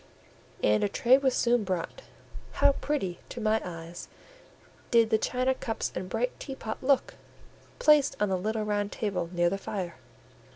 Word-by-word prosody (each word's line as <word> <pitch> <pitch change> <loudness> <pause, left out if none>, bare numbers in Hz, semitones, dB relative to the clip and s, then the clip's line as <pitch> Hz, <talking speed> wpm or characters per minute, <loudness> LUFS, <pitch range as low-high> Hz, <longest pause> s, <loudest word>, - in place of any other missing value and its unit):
And 105 0 +3
a 205 - +1
tray 255 +5 +4
was 265 -2 +1
soon 240 -2 +2
brought. 185 -4 -3 0.5
How 280 - +4
pretty, 270 - -2
to - - -7
my 220 0 +1
eyes, 170 -1 -8 0.8
did 230 -2 +4
the 220 - +4
china 255 +3 +1
cups 225 -3 -3
and 185 +1 -5
bright 240 +4 -2
teapot 265 -6 -6
look, 270 0 +2 0.6
placed 300 -2 +4
on 210 - +1
the 190 - +1
little 215 +4 -1
round 205 -1 -1
table 195 -6 -2
near 175 -1 +2
the 195 - -2
fire! 185 -3 -5
220 Hz, 160 wpm, -28 LUFS, 185-250 Hz, 0.8 s, tray